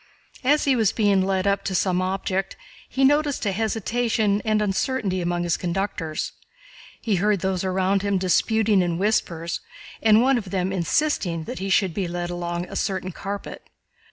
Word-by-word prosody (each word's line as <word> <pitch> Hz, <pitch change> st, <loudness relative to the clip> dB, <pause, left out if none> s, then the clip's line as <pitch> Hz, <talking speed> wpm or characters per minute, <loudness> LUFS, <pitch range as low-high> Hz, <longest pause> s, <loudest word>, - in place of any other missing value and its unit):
As 290 Hz, +4 st, +3 dB
he 275 Hz, -2 st, +3 dB
was 220 Hz, -5 st, +3 dB
being 205 Hz, -3 st, +2 dB
led 190 Hz, 0 st, 0 dB
up 200 Hz, 0 st, +1 dB
to 190 Hz, -, -1 dB
some 180 Hz, 0 st, +1 dB
object 190 Hz, 0 st, -2 dB, 0.3 s
he 270 Hz, -, 0 dB
noticed 290 Hz, -1 st, +2 dB
a 200 Hz, -, +1 dB
hesitation 220 Hz, 0 st, 0 dB
and 215 Hz, -1 st, +1 dB
uncertainty 205 Hz, -1 st, 0 dB
among 175 Hz, 0 st, -1 dB
his 170 Hz, -2 st, 0 dB
conductors. 175 Hz, -3 st, -3 dB, 0.7 s
He 210 Hz, -5 st, 0 dB
heard 205 Hz, 0 st, +1 dB
those 190 Hz, 0 st, -1 dB
around 190 Hz, +1 st, +1 dB
him 200 Hz, -1 st, 0 dB
disputing 205 Hz, +2 st, +2 dB
in 175 Hz, -2 st, -1 dB
whispers 170 Hz, -4 st, -1 dB, 0.4 s
and 220 Hz, -1 st, +6 dB
one 265 Hz, -1 st, +3 dB
of 200 Hz, -4 st, -9 dB
them 185 Hz, 0 st, -1 dB
insisting 180 Hz, -, 0 dB
that 165 Hz, -, -6 dB
he 195 Hz, +1 st, -3 dB
should 190 Hz, -2 st, +2 dB
be 190 Hz, -1 st, -2 dB
led 175 Hz, 0 st, -3 dB
along 175 Hz, 0 st, -3 dB
a -, -, -9 dB
certain 190 Hz, -2 st, -2 dB
carpet. 200 Hz, +3 st, -7 dB
195 Hz, 170 wpm, -24 LUFS, 180-215 Hz, 0.7 s, and